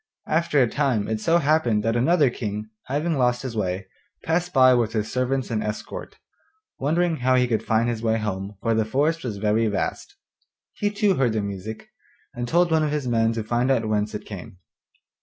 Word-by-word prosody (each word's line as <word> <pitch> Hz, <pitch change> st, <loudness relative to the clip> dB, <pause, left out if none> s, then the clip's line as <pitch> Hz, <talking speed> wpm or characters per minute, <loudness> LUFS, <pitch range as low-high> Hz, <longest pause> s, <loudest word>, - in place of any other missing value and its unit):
After 160 Hz, -2 st, +1 dB
a 125 Hz, -, +5 dB
time 125 Hz, -5 st, 0 dB
it 110 Hz, -1 st, -2 dB
so 165 Hz, +8 st, +3 dB
happened 140 Hz, -9 st, +2 dB
that 115 Hz, +1 st, 0 dB
another 145 Hz, +2 st, +3 dB
King, 105 Hz, -2 st, -5 dB
having 150 Hz, +3 st, -1 dB
lost 125 Hz, 0 st, +1 dB
his 125 Hz, -3 st, -5 dB
way, 95 Hz, -2 st, -2 dB, 0.4 s
passed 170 Hz, +2 st, 0 dB
by 130 Hz, -4 st, +6 dB
with 115 Hz, -2 st, +1 dB
his 110 Hz, -1 st, -2 dB
servants 130 Hz, 0 st, -1 dB
and 110 Hz, -1 st, -1 dB
escort, 105 Hz, 0 st, -6 dB, 0.6 s
wondering 165 Hz, +4 st, +1 dB
how 130 Hz, +1 st, +2 dB
he 125 Hz, -1 st, +3 dB
could 115 Hz, -3 st, 0 dB
find 115 Hz, +1 st, +1 dB
his 115 Hz, -2 st, -2 dB
way 110 Hz, -1 st, +1 dB
home, 100 Hz, -2 st, -4 dB
for 115 Hz, -, +2 dB
the 110 Hz, 0 st, +2 dB
forest 145 Hz, +9 st, 0 dB
was 115 Hz, -5 st, -4 dB
very 110 Hz, +2 st, +1 dB
vast. 100 Hz, -2 st, -3 dB, 0.6 s
He 205 Hz, -, -1 dB
too 205 Hz, -2 st, +1 dB
heard 125 Hz, -4 st, +2 dB
the 110 Hz, -, 0 dB
music, 100 Hz, +2 st, -6 dB, 0.4 s
and 120 Hz, 0 st, -4 dB
told 170 Hz, +4 st, +2 dB
one 160 Hz, -1 st, +3 dB
of 155 Hz, -, +1 dB
his 145 Hz, -3 st, -2 dB
men 115 Hz, -1 st, +2 dB
to 115 Hz, -1 st, -3 dB
find 120 Hz, +4 st, 0 dB
out 115 Hz, -5 st, +2 dB
whence 105 Hz, 0 st, -1 dB
it -, -, -6 dB
came. 95 Hz, -2 st, -9 dB
120 Hz, 200 wpm, -24 LUFS, 110-145 Hz, 0.6 s, by